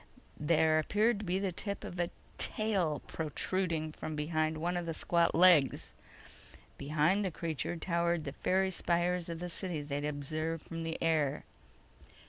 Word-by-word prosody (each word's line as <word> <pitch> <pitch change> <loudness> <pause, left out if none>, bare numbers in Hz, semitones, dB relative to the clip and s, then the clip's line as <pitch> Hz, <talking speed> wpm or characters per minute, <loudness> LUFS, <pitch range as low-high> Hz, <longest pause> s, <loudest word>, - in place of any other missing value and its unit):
There 155 +1 +3
appeared 210 +7 +2
to 210 - -6
be 180 +1 0
the 195 -1 -1
tip 200 +3 -4
of 180 - -7
a 175 - +2 0.3
tail 190 -9 +1
protruding 160 0 -1
from 155 0 -6
behind 155 +1 0
one 175 +3 -1
of 175 -1 -2
the 165 - -3
squat 170 +1 +2
legs. 170 -5 +5 0.8
Behind 155 +8 +1
the 190 - 0
creature 165 0 -3
towered 170 -1 0
the 140 - -4
faery 190 +4 +1
spires 175 0 0
of 165 - -4
the 180 +2 -5
city 175 -3 -3
they'd 145 0 -3
observed 155 +2 -2
from 165 0 -6
the 165 0 -3
air. 155 -4 +1
165 Hz, 155 wpm, -32 LUFS, 155-180 Hz, 0.8 s, legs